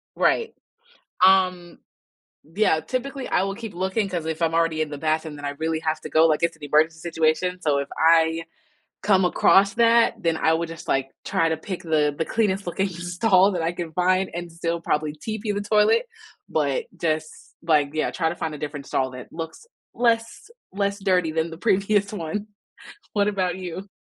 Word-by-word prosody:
Right. 460 -1 +1 0.7
Um, 185 -2 +3 0.8
yeah, 200 -6 +3
typically, 255 - -4
I 180 - +1
will 195 0 -3
keep 225 -2 -7
looking 190 +4 -1
'cause 175 -4 -3
if 160 +1 -4
I'm 165 -1 +1
already 165 -1 +1
in 155 - -1
the 145 - -6
bathroom, 155 0 -1
then 145 0 -8
I - - -1
really 160 0 -1
have 160 0 -1
to - - -7
go, 160 +1 +5
like 155 0 +1
it's 170 - +1
an 155 - -18
emergency 155 +2 +2
situation. 170 +2 0
So 145 -4 +1
if 140 - -3
I 165 0 +4 0.6
come 190 -3 +4
across 195 +2 +4
that, 230 0 +4
then 165 -1 +1
I 160 - +2
would 165 0 -1
just 165 0 -9
like 135 0 0 0.2
try 190 -4 +1
to 160 - -1
pick 185 +3 -6
the 150 -3 +1
the 160 - -1
cleanest 200 -2 0
looking 190 +3 0
stall 185 +3 +2
that 180 -3 -2
I 165 +1 -1
can 170 -2 -5
find 185 +2 +2
and 175 0 -6
still 165 0 -2
probably 150 -2 -1
TP 215 +7 -4
the 205 - -2
toilet, 215 - +3 0.4
but 485 -2 0
just 155 -1 -3
like, 150 -4 +2
yeah, 155 - 0
try 165 -3 0
to - - -4
find 160 -1 -4
a - - -7
different 145 -1 -6
stall 130 -1 -1
that 125 -1 -9
looks 165 - -7 0.3
less 230 - 0 0.2
less 200 +1 -1
dirty 180 -4 +2
than 160 +1 -1
the 165 - -8
previous 200 +3 +1
one. 205 +3 -4 0.7
What 205 -1 +2
about 185 -3 -1
you? 185 +1 -6
170 Hz, 190 wpm, -24 LUFS, 160-195 Hz, 0.8 s, go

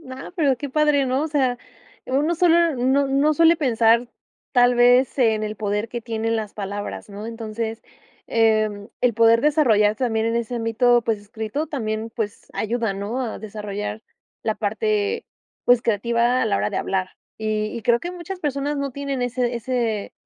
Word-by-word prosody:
No, 260 +3 -9
pero 280 -6 +2
qué 285 +3 -5
padre, 295 -1 +2
¿no? 260 +3 0
O 315 - -2
sea, 260 -5 +1 0.5
uno 290 +6 +1
solo 340 -2 +4
no 265 +3 +2
no 280 +3 +2
suele 330 +2 +5
pensar 235 -4 +3 0.4
tal 245 -1 +5
vez, 245 +2 +4
en 220 -3 +3
el 215 0 -4
poder 210 +1 -2
que 235 0 -5
tienen 225 0 -1
las 215 -2 -4
palabras, 205 +1 -5
¿no?, 205 +1 -8
entonces, 225 0 -5 0.4
em, 215 -2 +1
el 245 -2 +2
poder 230 +1 +5
desarrollar 225 -9 +3
también 225 -3 0
en 230 0 0
ese 235 +1 -2
ámbito, 240 +2 +3
pues 220 -2 0
escrito, 220 +7 -4
también, 225 -6 -3
pues 210 -3 -5
ayuda, 225 -1 -1
¿no? 200 +6 -4
A 235 - -4
desarrollar 210 0 -5 0.4
la - - 0
parte, 430 0 -1 0.4
pues, 245 -1 +5
creativa 235 +3 +1
a - - +2
la - - +1
hora 105 +1 0
de - - -4
hablar. 185 -1 -1 0.3
Y 215 -1 -1
y 230 - -6
creo 235 +2 +3
que 345 - -5
muchas 360 +1 -7
personas 290 0 -2
no 280 -1 -2
tienen 275 -1 -3
ese 245 0 -1
ese 235 -3 -2
235 Hz, 175 wpm, -22 LUFS, 220-275 Hz, 0.5 s, suele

